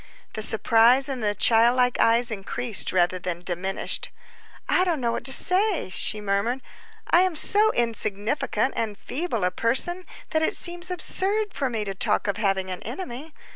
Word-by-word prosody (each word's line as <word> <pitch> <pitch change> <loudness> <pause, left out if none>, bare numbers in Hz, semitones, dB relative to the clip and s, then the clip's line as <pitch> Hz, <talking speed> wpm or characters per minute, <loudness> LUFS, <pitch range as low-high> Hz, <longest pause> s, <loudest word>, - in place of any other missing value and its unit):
The 215 - -5
surprise 230 +4 +3
in 265 -3 -5
the 205 -1 -1
child 230 +4 +3
like 250 -1 +1
eyes 235 +1 +3
increased 215 +2 -1
rather 185 0 +1
than 175 -1 -5
diminished. 185 +2 -3 0.6
"I 365 - +2
don't 345 -5 -1
know 235 -2 -1
what - - -4
to 265 - +5
say," 370 - +3
she 215 - -2
murmured. 210 +5 -2 0.5
"I 345 - +5
am 370 -2 0
so 420 +7 +3
insignificant 230 +4 -1
and 215 -3 -3
feeble 270 - -4
a 180 - +1
person 310 - +1 0.3
that 315 - 0
it 315 - +1
seems 350 +1 0
absurd 400 +3 -1
for 270 -2 -2
me 225 -3 -3
to 195 - -4
talk 195 - 0
of 200 -2 -2
having 195 -3 -1
an 185 - -6
enemy. 275 - -8
235 Hz, 175 wpm, -24 LUFS, 205-315 Hz, 0.6 s, to